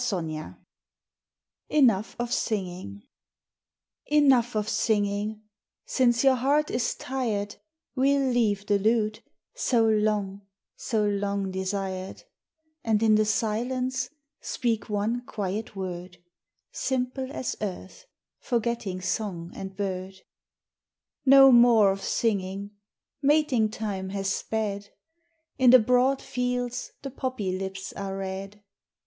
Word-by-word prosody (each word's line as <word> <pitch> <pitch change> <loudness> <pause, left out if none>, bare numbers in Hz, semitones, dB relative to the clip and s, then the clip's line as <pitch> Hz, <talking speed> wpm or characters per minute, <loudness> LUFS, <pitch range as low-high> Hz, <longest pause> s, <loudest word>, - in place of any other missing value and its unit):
XXII 165 -9 -2 1.3
Enough 230 -9 +3
of 240 0 -2
Singing 180 - -3 1.1
Enough 265 -6 +4
of 210 0 0
singing; 210 0 0 0.4
since 240 -2 +2
your 270 -1 +6
heart 280 +4 +1
is 240 -1 0
tired, 220 -6 -3 0.4
We'll 275 +1 +2
leave 210 -5 +1
the 205 -1 +2
lute, 215 +1 +1 0.3
so 245 - +2
long, 210 -2 +1 0.3
so 220 -3 -1
long 200 -1 -1
desired, 190 0 -4 0.6
And 220 -1 +1
in 220 -1 +5
the 215 0 +4
silence 250 +4 -1 0.3
speak 230 -3 -2
one 215 +4 -1
quiet 205 +1 -4
word, 180 -1 -6 0.5
Simple 260 0 -2
as 260 -4 -3
earth, 195 - -6 0.3
forgetting 230 -6 -2
song 185 -3 -3
and 190 0 -7
bird. 190 -1 -3 1.1
No 270 0 +9
more 235 -4 +6
of 195 0 -4
singing; 200 -2 -1 0.5
mating 275 -6 +3
time 200 -3 -4
has 195 0 -1
sped, 205 -2 -3 0.7
In 255 -1 +6
the 255 - +10
broad 250 +3 +2
fields 250 -1 -2
the 275 - -5
poppy 245 -8 -3
lips 190 0 -5
are 195 -1 -5
red. 195 +1 -6
215 Hz, 110 wpm, -26 LUFS, 195-245 Hz, 1.3 s, the